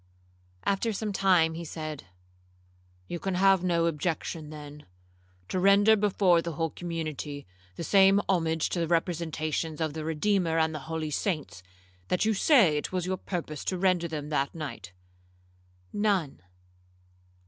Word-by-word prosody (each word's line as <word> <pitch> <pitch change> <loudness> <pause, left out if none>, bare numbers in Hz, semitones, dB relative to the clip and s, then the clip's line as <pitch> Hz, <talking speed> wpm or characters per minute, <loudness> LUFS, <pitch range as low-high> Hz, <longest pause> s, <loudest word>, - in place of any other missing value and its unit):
After 200 +3 0
some 210 0 -3
time, 180 -4 +3
he 170 +1 -6
said, 155 - -6 1.0
'You 175 - -4
can 190 +1 -2
have 190 0 +4
no 170 -2 +2
objection, 160 -1 -2
then, 150 -3 -10 0.6
to 185 - -2
render 200 +3 +6
before 195 -4 +3
the 170 0 -5
whole 165 +1 -2
community 155 -4 -5 0.3
the - - -5
same 195 +2 +5
homage 165 -3 +1
to 175 - -2
the 165 - 0
representations 160 -2 -1
of 160 -2 -1
the 155 0 -5
Redeemer 165 +2 +1
and 160 0 +2
the 155 - -4
holy 160 -2 -3
saints, 150 - -2 0.5
that 180 - +1
you 220 - +2
say 200 - +4
it - - -6
was 180 -2 -1
your 185 0 -1
purpose 165 -6 -5
to 185 - -1
render 180 -2 +2
them 150 -2 -5
that 140 -1 -1
night?'—'None.' 90 - -5
165 Hz, 145 wpm, -28 LUFS, 150-185 Hz, 1.0 s, render